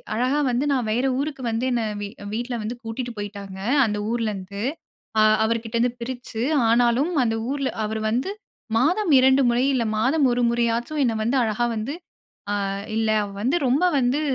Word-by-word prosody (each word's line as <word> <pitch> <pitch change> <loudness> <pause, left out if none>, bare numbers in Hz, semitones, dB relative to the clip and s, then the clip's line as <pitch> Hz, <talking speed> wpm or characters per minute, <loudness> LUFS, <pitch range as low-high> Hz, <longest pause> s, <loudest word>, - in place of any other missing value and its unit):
அழகா 255 +6 +1
வந்து 245 +4 0
நான் 250 -4 0
வேற 245 +4 +1
ஊருக்கு 280 -1 -3
வந்து 225 +3 -1
என்ன 235 -2 +1 0.2
வீ 205 - -3 0.3
வீட்ல 240 +2 -3
வந்து 225 +3 -4
கூட்டிட்டு 235 +2 -5
போயிட்டாங்க. 200 -2 -7 0.3
அந்த 210 -1 -1
ஊரிலேருந்து 200 -4 -3 0.6
அ - - +6 0.2
அவர்கிட்ட 230 0 -2
இருந்து 240 +1 +1
பிரிச்சு, 245 -2 -5 0.3
ஆனாலும் 240 +8 +3
அந்த 225 -1 0 0.2
ஊர்ல 275 -2 -1 0.2
அவர் 220 +1 -3
வந்து 255 - -1 0.5
மாதம் 345 - +2
2 265 +1 +5
முறை, 240 +1 +2
இல்ல 250 -3 +1 0.2
மாதம் 275 +4 +3
1 245 - 0
முறையாச்சும் 235 +5 0
என்ன 235 - +1
வந்து 240 +5 +1
அழகா 220 +1 0
வந்து, 220 +6 -3 0.6
அ - - +1 0.4
இல்ல 225 0 +1 0.2
அவ 205 - -5
வந்து 260 +7 +2
ரொம்ப 275 +8 +2 0.2
வந்து 255 +4 +1
240 Hz, 165 wpm, -23 LUFS, 225-260 Hz, 0.6 s, அ